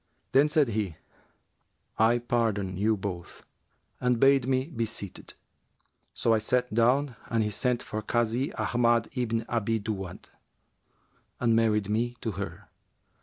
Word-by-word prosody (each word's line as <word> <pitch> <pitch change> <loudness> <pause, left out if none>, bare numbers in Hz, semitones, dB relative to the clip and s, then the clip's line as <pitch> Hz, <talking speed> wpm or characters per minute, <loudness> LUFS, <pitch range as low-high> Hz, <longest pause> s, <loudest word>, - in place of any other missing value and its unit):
Then 140 +3 +5
said 150 -4 +3
he, 105 -6 -2 1.0
'I 115 +2 +5
pardon 105 -6 0
you 105 +3 +1
both,' 95 -3 -6 0.5
and 125 -2 +1
bade 135 -1 +5
me 130 0 +1
be 135 -7 -3
seated. 100 -3 -6 0.8
So 115 - +2
I 110 - +3
sat 125 +2 0
down 125 +4 +2
and 115 -1 +2
he 105 - -1
sent 125 +4 0
for 110 - -4
the - - -26
Kazi 120 +3 +1
Ahmad 120 -1 +2
ibn 115 -2 -1
Abi 115 -1 0
Duwбd[FN#367] 95 -4 -5 1.2
and 115 -2 +3
married 110 -3 +2
me 115 +3 0
to 115 - -3
her. 100 0 -6
115 Hz, 140 wpm, -28 LUFS, 105-125 Hz, 1.2 s, Then